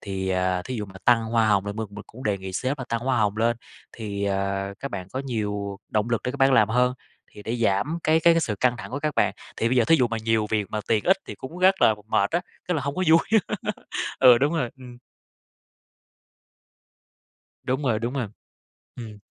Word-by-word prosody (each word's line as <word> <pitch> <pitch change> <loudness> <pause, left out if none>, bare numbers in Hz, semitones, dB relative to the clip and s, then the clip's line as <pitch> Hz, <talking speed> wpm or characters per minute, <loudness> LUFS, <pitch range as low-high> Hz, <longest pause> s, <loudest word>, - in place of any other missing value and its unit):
Thì, 95 -1 -4
à, 90 -1 0
thí 130 - -5
dụ 105 - -3
mà 95 - -14
tăng 120 -2 +4
hoa 110 0 +2
hồng 100 -1 +2
là 100 - -2
mình 110 +1 -4
mình 105 +1 -9
cũng 130 +3 -12
đề 100 -2 0
nghị 95 0 -7
sếp 130 +9 -2
là 130 - -4
tăng 115 0 -1
hoa 130 +2 0
hồng 105 -1 +1
lên, 115 +1 +1 0.4
thì, 100 -3 -4
ờ, 100 0 -1
các 140 - -5
bạn 95 -2 -6
có 130 - -2
nhiều 105 -5 -3
động 110 +2 -1
lực 115 - 0
để 125 - 0
các - - -6
bạn 135 0 +4
làm 110 -5 +5
hơn, 125 +2 +2 0.4
thì 105 - -11
để 115 +3 -3
giảm 115 +8 0
cái 160 +1 +4
cái 170 0 +5
cái 165 - +2
sự 110 -9 -1
căng 125 -1 +3
thẳng - - -8
của 135 - -3
các 150 +1 -2
bạn - - +2 0.2
thì 115 - +1
bây 130 - +1
giờ 120 - +5
thí 165 - +5
dụ 125 -5 +2
mà 115 - -2
nhiều 110 -1 +2
việc 105 -2 0
mà 110 - -2
tiền 110 -2 +2
ít 190 - +5
thì - - -6
cũng 160 +7 -9
rất 190 +1 +5
là 110 - +6
mệt 100 -2 +2
á, 170 - +1 0.3
rất 180 - +1
là 150 - -1
hông 140 +1 -3
có 185 - -1
vui, 165 +1 +7 1.0
ừ, 125 -2 +8
đúng 145 +5 +1
rồi, 125 -8 -1
ừm. 125 -2 -12 2.7
Đúng 130 +2 -1
rồi, 120 -5 +1
đúng 120 +3 -3
rồi. 130 -5 -2 0.7
Ừm. 110 -4 -9
115 Hz, 235 wpm, -25 LUFS, 105-130 Hz, 2.7 s, ừ